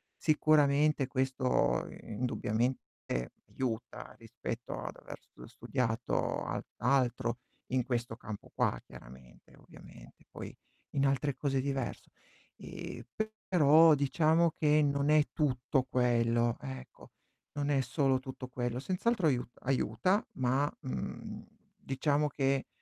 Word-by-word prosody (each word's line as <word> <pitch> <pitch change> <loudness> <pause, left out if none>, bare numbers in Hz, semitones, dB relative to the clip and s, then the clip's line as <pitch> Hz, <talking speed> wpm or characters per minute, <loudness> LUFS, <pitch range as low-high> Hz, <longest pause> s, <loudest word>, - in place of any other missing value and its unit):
sicuramente 150 -2 +3
questo 130 -1 +1 0.2
indubbiamente 115 - -2 0.2
aiuta 120 -4 -4
rispetto - - -6
ad - - -6
aver - - -10
stu - - -19
ehm, - - -8
studiato 120 -1 -1
al - - -3
altro 125 -1 +1 0.3
in 130 - +3
questo 120 -2 -2
campo 110 -3 -8
qua - - +1
chiaramente, 65 0 -15
ovviamente, - - -15
poi - - -8 0.4
in 140 0 +1
altre 135 0 +1
cose 135 -2 -1
è - - +2
diverso. 135 -2 -3 0.5
Ehm, - - -8 0.5
però 160 -2 +7
diciamo 160 +4 +3
che 150 -1 +3
non 140 0 +1
è 155 -1 +5
tutto 135 -2 +1
quello, 120 -2 +2
ecco. 65 -1 -9 0.5
Non 145 0 0
è 140 -2 +3
solo 135 +1 +1
tutto 130 0 -8
quello, 120 -1 -2
senz'altro 185 - 0
aiu 125 -4 +2 0.2
aiuta, 135 - +1
ma, 130 +3 +1
mhmm, 65 0 -5 0.3
diciamo 145 +2 0
che, 135 -1 0
130 Hz, 120 wpm, -32 LUFS, 120-145 Hz, 0.5 s, però